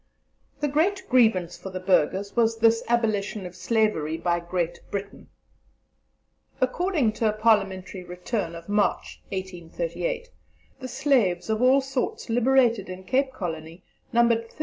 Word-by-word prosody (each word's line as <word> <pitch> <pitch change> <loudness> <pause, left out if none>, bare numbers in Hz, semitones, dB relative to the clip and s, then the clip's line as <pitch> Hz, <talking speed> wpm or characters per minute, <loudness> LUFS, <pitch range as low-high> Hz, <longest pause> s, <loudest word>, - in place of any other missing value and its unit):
The 295 - +2
great 375 +7 0
grievance 220 -9 +3
for 190 - -7
the 185 0 -5
Burghers 190 +2 +1
was 230 -1 +2
this 225 0 +4
abolition 215 -4 0
of 180 0 -8
slavery 180 -7 0
by 170 +1 0
Great 175 0 -3
Britain. 200 0 -6 1.3
According 290 - +1
to 220 0 +1
a - - 0
Parliamentary 195 -4 +1
Return 180 0 -4
of 170 0 -10
March, 205 0 0
1838, 195 - -4 0.5
the 260 - -6
slaves 225 -9 +1
of 220 +1 0
all 260 +2 +5
sorts 265 -3 -3
liberated 240 -4 +3
in 185 +1 -7
Cape 265 +6 +1
Colony 165 -4 -6 0.3
numbered 235 -1 +4
35,750. - - -23
215 Hz, 135 wpm, -25 LUFS, 185-250 Hz, 1.3 s, all